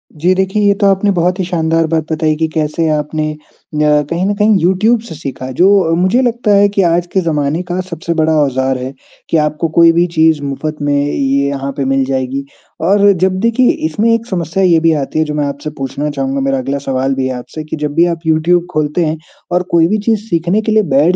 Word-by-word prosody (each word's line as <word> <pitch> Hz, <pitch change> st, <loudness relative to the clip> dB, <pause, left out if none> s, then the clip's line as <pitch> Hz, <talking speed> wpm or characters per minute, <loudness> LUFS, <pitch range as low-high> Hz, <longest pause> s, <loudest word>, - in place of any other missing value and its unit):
जी, 175 Hz, +5 st, +2 dB
देखिए 190 Hz, +2 st, 0 dB
ये 200 Hz, 0 st, +4 dB
तो 200 Hz, -, +4 dB
आपने 195 Hz, +1 st, +2 dB
बहुत 180 Hz, +1 st, 0 dB
ही -, -, 0 dB
शानदार 165 Hz, -2 st, 0 dB
बात 160 Hz, 0 st, -2 dB
बताई 155 Hz, 0 st, 0 dB
है 155 Hz, -, +1 dB
कि 160 Hz, +1 st, -1 dB
कैसे 160 Hz, +1 st, -1 dB
आपने 155 Hz, 0 st, -1 dB
अ, 150 Hz, -, -13 dB, 0.4 s
कहीं 150 Hz, +3 st, +1 dB
न 205 Hz, -, +1 dB
कहीं 210 Hz, +1 st, +3 dB
यूट्यूब 200 Hz, +7 st, +2 dB
से 160 Hz, -, -8 dB
सीखा 135 Hz, -3 st, -6 dB
जो 185 Hz, +2 st, +3 dB
मुझे 185 Hz, +8 st, +2 dB
लगता 240 Hz, -3 st, 0 dB
है 200 Hz, 0 st, +5 dB
कि 195 Hz, -, +3 dB
आज 175 Hz, -1 st, +1 dB
के 190 Hz, -, +2 dB
ज़माने 155 Hz, -1 st, -1 dB
का 180 Hz, -, -1 dB
सबसे 170 Hz, 0 st, -3 dB
बड़ा 160 Hz, 0 st, +2 dB
औज़ार 130 Hz, -1 st, 0 dB
है, 130 Hz, +1 st, -6 dB, 0.4 s
कि 165 Hz, -, +2 dB
आपको 150 Hz, +1 st, 0 dB
कोई 170 Hz, 0 st, +7 dB
भी 170 Hz, +1 st, +2 dB
चीज़ 160 Hz, -2 st, +3 dB
मुफ़्त 150 Hz, +2 st, -4 dB
में 145 Hz, 0 st, 0 dB
ये 140 Hz, -1 st, 0 dB
यहाँ 140 Hz, -1 st, -3 dB
पे 140 Hz, -, -1 dB
मिल 135 Hz, 0 st, +1 dB
जाएगी 135 Hz, +1 st, -3 dB, 0.4 s
और 200 Hz, +1 st, +5 dB
जब 185 Hz, 0 st, +1 dB
देखिए 230 Hz, +4 st, +2 dB, 0.2 s
इसमें 230 Hz, -2 st, +1 dB
एक 230 Hz, 0 st, -1 dB
समस्या 180 Hz, -2 st, -2 dB
ये 170 Hz, -3 st, +4 dB
भी 165 Hz, 0 st, +2 dB
आती 140 Hz, +3 st, -3 dB
है 155 Hz, -, +2 dB
जो 150 Hz, -, -4 dB
मैं 150 Hz, -, 0 dB
आपसे 140 Hz, +2 st, -5 dB
पूछना 140 Hz, +2 st, -3 dB
चाहूँगा, 135 Hz, -1 st, -2 dB
मेरा 135 Hz, 0 st, 0 dB
अगला 135 Hz, +2 st, -2 dB
सवाल 135 Hz, +1 st, 0 dB
भी 130 Hz, -1 st, -1 dB
है 130 Hz, -, -3 dB
आपसे 155 Hz, +5 st, -8 dB
कि 155 Hz, -, -5 dB
जब 150 Hz, -1 st, -3 dB
भी 170 Hz, -, +4 dB
आप -, -, -18 dB
यूट्यूब 165 Hz, +2 st, +2 dB
खोलते 155 Hz, +1 st, 0 dB
हैं 155 Hz, +1 st, -2 dB, 0.3 s
और 180 Hz, +1 st, +1 dB
कोई 165 Hz, -1 st, +4 dB
भी 215 Hz, -, 0 dB
चीज़ 220 Hz, -2 st, +2 dB
सीखने 175 Hz, +5 st, +1 dB
के 220 Hz, -, -2 dB
लिए 215 Hz, 0 st, +3 dB
बैठ 160 Hz, +6 st, +4 dB
160 Hz, 235 wpm, -14 LUFS, 145-185 Hz, 0.4 s, कोई